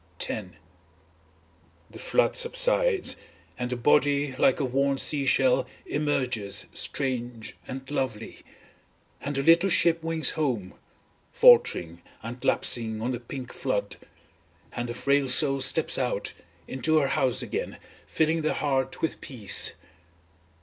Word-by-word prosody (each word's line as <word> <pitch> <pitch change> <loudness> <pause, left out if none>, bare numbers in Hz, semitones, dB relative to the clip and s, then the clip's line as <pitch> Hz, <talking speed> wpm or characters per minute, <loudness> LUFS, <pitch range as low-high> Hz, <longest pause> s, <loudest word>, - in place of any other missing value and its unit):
X 105 -4 -4 1.4
The - - -11
flood - - +1
subsides, - - +2 0.4
and 125 0 -4
the 125 - -2
body, 145 +1 +2
like 130 - +3
a 140 - 0
worn 135 +2 0
sea 140 0 0
shell 130 -1 +2 0.2
emerges 125 -9 -1
strange 120 -4 -4
and 135 +1 -7
lovely. 125 -6 -4 0.8
And 145 0 -4
the 135 - 0
little 170 +5 +5
ship 165 -2 +3
wings 165 -1 +1
home, 125 -12 -2 0.6
faltering 90 - +4 0.2
and 120 +3 -8
lapsing 110 -4 +1
on 120 +3 -2
the 120 - -3
pink 125 +1 -8
flood, - - -3 0.7
and 120 0 -5
the 120 - -5
frail 140 +1 +1
soul 135 +1 +1
steps - - +2
out, - - -2 0.3
into 155 +5 +1
the 140 -2 0
house 135 -4 +1
again - - -4 0.3
filling 160 +1 +1
the 155 - -1
heart 135 -3 -2
with 160 - -2
peace. 105 -10 +1
135 Hz, 130 wpm, -26 LUFS, 125-155 Hz, 1.4 s, little